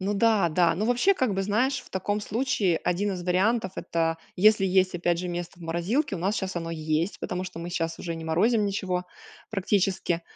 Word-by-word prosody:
Ну 195 Hz, +2 st, -1 dB
да, 210 Hz, -4 st, +3 dB
да, 170 Hz, +1 st, +3 dB
ну 205 Hz, +5 st, -1 dB
вообще 245 Hz, -, +3 dB
как 255 Hz, -, 0 dB
бы 195 Hz, -, 0 dB
знаешь 230 Hz, +7 st, +1 dB
в -, -, -17 dB
таком 205 Hz, +3 st, -1 dB
случае 205 Hz, -6 st, 0 dB
один 195 Hz, +3 st, 0 dB
из 180 Hz, -1 st, -5 dB
вариантов- 190 Hz, +2 st, +1 dB
это 165 Hz, -1 st, -1 dB, 0.2 s
если 210 Hz, +1 st, +5 dB
есть 185 Hz, 0 st, +2 dB
опять 175 Hz, -1 st, 0 dB
же 180 Hz, +1 st, -3 dB
место 175 Hz, 0 st, -5 dB
в 175 Hz, -, -13 dB
морозилке, 190 Hz, -, -1 dB
у -, -, -6 dB
нас 195 Hz, +5 st, 0 dB
щас 190 Hz, -1 st, -3 dB
оно 165 Hz, -1 st, -3 dB
есть, 160 Hz, +2 st, -1 dB
потому 180 Hz, 0 st, -3 dB
что 180 Hz, -, -8 dB
мы 170 Hz, +1 st, -5 dB
щас 165 Hz, -1 st, -2 dB
уже 170 Hz, -1 st, -4 dB
не 165 Hz, 0 st, -7 dB
морозим 210 Hz, +7 st, +2 dB
ничего 185 Hz, -3 st, -2 dB, 0.5 s
практически. 190 Hz, -4 st, 0 dB
185 Hz, 210 wpm, -26 LUFS, 170-210 Hz, 0.5 s, если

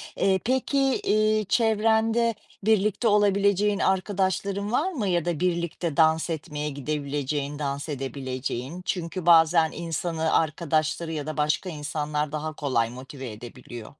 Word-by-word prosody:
Eee, 190 Hz, -1 st, +2 dB
peki, 260 Hz, +2 st, 0 dB
eee, 215 Hz, -5 st, +2 dB
çevrende 225 Hz, 0 st, +2 dB, 0.3 s
birlikte 215 Hz, +1 st, +2 dB
olabileceğin 205 Hz, 0 st, +3 dB
arkadaşların 195 Hz, +1 st, 0 dB
var 345 Hz, +9 st, +1 dB
mı? 230 Hz, -, -2 dB
Ya 175 Hz, -2 st, +1 dB
da 170 Hz, -3 st, -1 dB
birlikte 170 Hz, -2 st, -1 dB
dans 160 Hz, +1 st, +3 dB
etmeye 150 Hz, -1 st, -3 dB
gidebileceğin, 145 Hz, 0 st, -3 dB
dans 140 Hz, +1 st, -3 dB
edebileceğin? 135 Hz, +2 st, -4 dB
Çünkü 170 Hz, -1 st, -3 dB
bazen 165 Hz, -1 st, +5 dB
insanı 165 Hz, -1 st, -2 dB
arkadaşları 155 Hz, +1 st, 0 dB
ya 150 Hz, -2 st, -3 dB
da 155 Hz, 0 st, -5 dB
başka 150 Hz, +5 st, 0 dB
insanlar 150 Hz, -1 st, -3 dB
daha 155 Hz, +1 st, -3 dB
kolay 130 Hz, -6 st, 0 dB
motive 130 Hz, 0 st, -8 dB
edebiliyor. 120 Hz, +1 st, -10 dB
165 Hz, 125 wpm, -26 LUFS, 145-200 Hz, 0.3 s, bazen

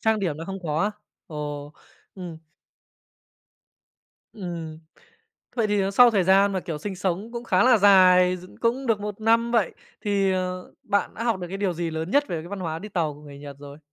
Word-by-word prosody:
trang 220 Hz, -1 st, +2 dB
điểm 165 Hz, -6 st, -1 dB
nó 165 Hz, -, -6 dB
không 195 Hz, +1 st, -5 dB
có 155 Hz, -1 st, -1 dB
á? 210 Hz, -, +1 dB, 0.4 s
Ồ, 150 Hz, -2 st, -6 dB, 0.4 s
ừm. 175 Hz, -4 st, -8 dB, 1.9 s
Ừm. 170 Hz, -6 st, -6 dB, 0.8 s
Vậy 225 Hz, -2 st, +2 dB
thì, 205 Hz, -1 st, +1 dB
ờ, 195 Hz, -, 0 dB
sau 240 Hz, +4 st, +7 dB
thời 195 Hz, -5 st, +2 dB
gian 195 Hz, +2 st, +4 dB
mà, 190 Hz, -, -1 dB
kiểu, 160 Hz, -4 st, -5 dB
sinh 190 Hz, +4 st, -5 dB
sống 190 Hz, +5 st, -2 dB
cũng 240 Hz, 0 st, -5 dB
khá 185 Hz, -3 st, +3 dB
là 250 Hz, -2 st, +6 dB
dài 185 Hz, -2 st, +6 dB
dựng 180 Hz, +1 st, -14 dB
cũng 250 Hz, +3 st, -1 dB
được 220 Hz, -3 st, +1 dB
1 210 Hz, 0 st, -5 dB
năm 230 Hz, +1 st, +3 dB
vậy 225 Hz, -7 st, +1 dB, 0.3 s
thì, 200 Hz, -2 st, +1 dB
ờ, 185 Hz, 0 st, -3 dB
bạn 205 Hz, -1 st, -1 dB
đã 230 Hz, -, -5 dB
học 225 Hz, -5 st, 0 dB
được 175 Hz, -, -5 dB
cái 195 Hz, -, -5 dB
điều 195 Hz, -3 st, 0 dB
gì 170 Hz, 0 st, -3 dB
lớn 160 Hz, +3 st, -4 dB
nhất 290 Hz, +1 st, +3 dB
về 170 Hz, -, -2 dB
cái 170 Hz, -, -10 dB
văn 200 Hz, -1 st, -6 dB
hóa 160 Hz, -2 st, -3 dB
đi 210 Hz, -, -8 dB
tàu 165 Hz, -7 st, -1 dB
của 145 Hz, -, -15 dB
người 145 Hz, -2 st, -12 dB
Nhật 140 Hz, -1 st, -9 dB
rồi? 145 Hz, 0 st, -11 dB
185 Hz, 215 wpm, -25 LUFS, 165-210 Hz, 1.9 s, sau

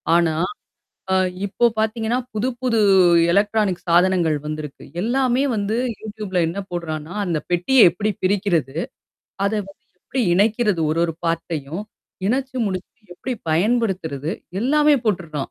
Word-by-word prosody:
ஆனா. 170 Hz, -2 st, +3 dB, 0.8 s
அ -, -, +4 dB, 0.3 s
இப்போ 210 Hz, +4 st, +2 dB
பாத்தீங்கன்னா, 220 Hz, +2 st, 0 dB, 0.2 s
புது 215 Hz, +4 st, 0 dB
புது 240 Hz, -3 st, +1 dB, 0.5 s
எலக்ட்ரானிக் 205 Hz, -1 st, +1 dB
சாதனங்கள் 175 Hz, -2 st, +3 dB
வந்திருக்கு. 150 Hz, -2 st, -6 dB, 0.2 s
எல்லாமே 255 Hz, +3 st, +1 dB
வந்து 210 Hz, +1 st, -1 dB, 0.2 s
யூடியூப்ல 210 Hz, -3 st, -4 dB
என்ன 170 Hz, +4 st, -5 dB
போடுறான்னா, 160 Hz, -2 st, -4 dB
அந்த 170 Hz, -4 st, 0 dB
பெட்டிய 185 Hz, +8 st, +5 dB
எப்படி 215 Hz, +4 st, -2 dB
பிரிக்கிறது? 185 Hz, -8 st, +1 dB, 0.7 s
அத 200 Hz, -, +1 dB, 0.2 s
வந்து 195 Hz, -, -16 dB, 0.2 s
எப்படி 265 Hz, -, -3 dB
இணைக்கிறது 210 Hz, -1 st, +2 dB
ஒரு 160 Hz, -, -1 dB
ஒரு 165 Hz, -, -1 dB
பார்ட் 165 Hz, 0 st, 0 dB
டையும் 155 Hz, +5 st, -4 dB, 0.5 s
இணச்சு 260 Hz, +2 st, -1 dB
முடிச்சு, 190 Hz, +3 st, -5 dB, 0.2 s
எப்படி 255 Hz, +8 st, -4 dB, 0.2 s
பயன்படுத்துறது? 175 Hz, -, 0 dB, 0.3 s
எல்லாமே 300 Hz, +3 st, +4 dB
போட்டுருக்கான். 170 Hz, -9 st, -2 dB
195 Hz, 125 wpm, -21 LUFS, 170-225 Hz, 0.8 s, பெட்டிய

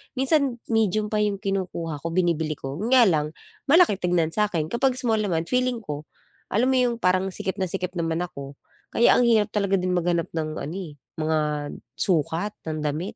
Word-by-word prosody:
Minsan, 270 Hz, -1 st, +2 dB, 0.2 s
medium 215 Hz, -1 st, +1 dB
pa 215 Hz, -, +1 dB
'yong 205 Hz, -2 st, 0 dB
kinukuha 180 Hz, -6 st, -2 dB
ko, 165 Hz, -, -5 dB
binibili 165 Hz, -4 st, +1 dB
ko, 135 Hz, +4 st, -6 dB
yun 220 Hz, -, -2 dB
nga 250 Hz, -, +8 dB
lang, 155 Hz, -5 st, +1 dB, 0.3 s
malaki 310 Hz, -, +5 dB
tignan 175 Hz, -3 st, +1 dB
sa 210 Hz, +2 st, +1 dB
'kin. 160 Hz, -6 st, -2 dB
Kapag 250 Hz, +2 st, +1 dB
small 230 Hz, -4 st, 0 dB
naman 175 Hz, -6 st, 0 dB
feeling 250 Hz, +3 st, 0 dB
ko, 150 Hz, -1 st, -6 dB, 0.4 s
alam 245 Hz, +6 st, +2 dB
mo -, -, +2 dB
'yong 245 Hz, -1 st, +2 dB
parang 185 Hz, -3 st, +1 dB
sikip 190 Hz, +1 st, -4 dB
na 185 Hz, -, 0 dB
sikip 180 Hz, 0 st, -3 dB
naman 165 Hz, +1 st, -1 dB
ako. 140 Hz, -4 st, -8 dB, 0.4 s
Kaya 235 Hz, -, +5 dB
ang 245 Hz, -, +4 dB
hirap 220 Hz, -3 st, +3 dB
talaga 200 Hz, -2 st, +1 dB
din 180 Hz, 0 st, -1 dB
maghanap 170 Hz, -1 st, 0 dB
ng 160 Hz, -2 st, -2 dB
ano 155 Hz, +5 st, -5 dB
eh, 175 Hz, -7 st, -6 dB, 0.2 s
mga 155 Hz, 0 st, +1 dB, 0.6 s
sukat 175 Hz, +3 st, 0 dB
ng 155 Hz, -1 st, -2 dB
damit. 155 Hz, +7 st, -3 dB
185 Hz, 190 wpm, -24 LUFS, 160-215 Hz, 0.6 s, nga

